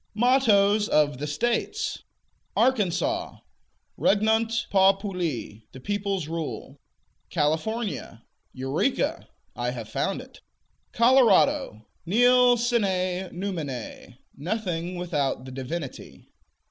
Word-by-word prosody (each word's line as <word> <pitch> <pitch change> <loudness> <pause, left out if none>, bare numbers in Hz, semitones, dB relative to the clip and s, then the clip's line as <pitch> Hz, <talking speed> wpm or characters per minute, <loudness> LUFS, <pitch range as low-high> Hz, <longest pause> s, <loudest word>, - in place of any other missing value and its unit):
MOTTOES 215 -4 +3
OF 145 -3 +2
THE 150 - -3
STATES. 240 - -1 0.6
Arkansas 260 - +1 0.6
Regnant 220 +2 +2
populi: 190 - +1
The 130 - -10
peoples 200 0 -2
rule. 155 -4 -5 0.5
California 160 - -2 0.3
Eureka: 135 - -1 0.3
I - - -2
have - - -6
found - - -1
it. - - -13 0.5
Colorado 260 - +3 0.2
Nil 245 +4 +5
sine 190 -6 0
numine: 150 - -6 0.2
Nothing 180 0 -3
without 145 -7 -2
the 130 - -8
Divinity. 135 +3 -7
190 Hz, 85 wpm, -25 LUFS, 150-230 Hz, 0.6 s, Nil